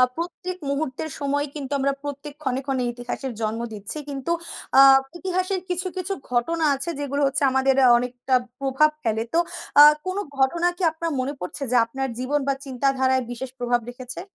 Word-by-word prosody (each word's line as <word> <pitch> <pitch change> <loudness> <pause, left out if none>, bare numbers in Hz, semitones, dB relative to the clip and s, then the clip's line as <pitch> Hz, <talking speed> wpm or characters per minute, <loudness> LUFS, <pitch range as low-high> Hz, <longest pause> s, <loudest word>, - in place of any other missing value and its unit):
প্রত্যেক 355 +2 -5
মুহূর্তের 280 +1 -2
সময় 285 0 0
কিন্তু 280 -2 -6
আমরা 275 +1 +1
প্রত্যেক 285 0 -6
ক্ষণে, 260 -2 0
ক্ষণে 265 -2 -1
ইতিহাসের 245 +2 -5
জন্ম 220 +1 -1
দিচ্ছি। 210 +7 -5
কিন্তু 275 +3 -3 0.5
আ - - +10 0.4
ইতিহাসের 370 +1 -1
কিছু, 360 +1 -1
কিছু 370 +2 -2 0.2
ঘটনা 315 +7 +1
আছে 275 +4 -4
যেগুলো 285 0 -2
হচ্ছে 275 +1 -1
আমাদের 265 0 +3 0.2
অনেকটা 250 +1 -3 0.3
প্রভাব 275 +3 +3
ফেলে। 225 -1 0
তো 335 - +4 0.4
আ - - +12 0.2
কোন 370 +1 -2 0.2
ঘটনা 335 +6 +2
কি 375 - -4
আপনার 330 +1 -3
মনে 260 +3 -1
পড়ছে 180 +10 -5
যে - - +2
আপনার 265 +3 -3
জীবন 275 +4 0
বা 275 - +3
চিন্তাধারায় 260 0 +1
বিশেষ 250 +2 -5
প্রভাব 245 0 +1
রেখেছে? 250 +1 -7
275 Hz, 165 wpm, -24 LUFS, 255-310 Hz, 0.5 s, আ